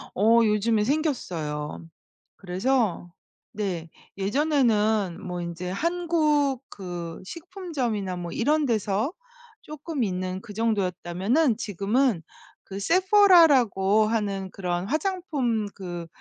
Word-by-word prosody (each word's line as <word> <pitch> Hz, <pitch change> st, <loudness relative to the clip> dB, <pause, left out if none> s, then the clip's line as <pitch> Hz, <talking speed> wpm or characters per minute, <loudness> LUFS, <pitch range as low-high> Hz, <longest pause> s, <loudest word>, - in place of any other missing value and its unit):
어 225 Hz, +4 st, +5 dB
요즘에 210 Hz, +1 st, +2 dB
생겼어요. 175 Hz, -, -2 dB, 0.5 s
그래서 195 Hz, -1 st, -1 dB, 0.4 s
네 180 Hz, -6 st, -4 dB, 0.3 s
예전에는 215 Hz, -, +1 dB
뭐 180 Hz, -1 st, -5 dB
인제 175 Hz, +1 st, -5 dB
한국 305 Hz, -, +1 dB
그 175 Hz, -3 st, -7 dB
식품점이나 275 Hz, -, -4 dB
뭐 175 Hz, -1 st, -6 dB
이런 295 Hz, +5 st, +1 dB
데서 215 Hz, +2 st, 0 dB, 0.5 s
쪼끔 305 Hz, -3 st, -4 dB
있는 185 Hz, -1 st, -3 dB
그 205 Hz, -, -10 dB
정도였다면은 210 Hz, -, 0 dB
지금은 210 Hz, 0 st, 0 dB, 0.4 s
그 195 Hz, 0 st, -7 dB
세포라라고 290 Hz, -, +5 dB
하는 200 Hz, -4 st, -2 dB
그런 180 Hz, 0 st, -3 dB
화장품 295 Hz, -, -1 dB
그 175 Hz, -3 st, -6 dB
215 Hz, 220 characters per minute, -25 LUFS, 185-285 Hz, 0.5 s, 어